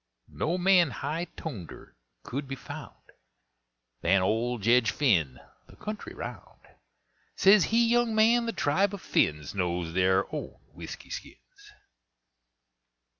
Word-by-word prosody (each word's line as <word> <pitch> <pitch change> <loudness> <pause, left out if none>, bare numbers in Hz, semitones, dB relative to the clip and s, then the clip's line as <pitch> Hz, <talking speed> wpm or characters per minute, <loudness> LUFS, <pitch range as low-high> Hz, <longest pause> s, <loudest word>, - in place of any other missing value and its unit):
No 170 +3 -1
man 180 -3 +4
high 155 +7 -4
toneder 110 - -8 0.3
could 140 +2 -5
be 135 - -4
found - - -11 0.9
Than 95 +2 +3
old 115 +2 -1
Jedge 115 0 +4
Phinn 85 - +1 0.3
the - - -17
country 215 - -7
round. 425 - -9 0.7
Says 195 0 +6
he, 230 +1 +3
"Young 240 -1 +2
man, 230 +2 +4
the - - 0
tribe 195 +4 +1
of 200 - -11
Phinns 75 -1 0
Knows 90 -3 -2
their 95 +1 +3
own - - -5 0.2
whisky - - -9
skins!" - - -11
140 Hz, 125 wpm, -28 LUFS, -, 0.9 s, Says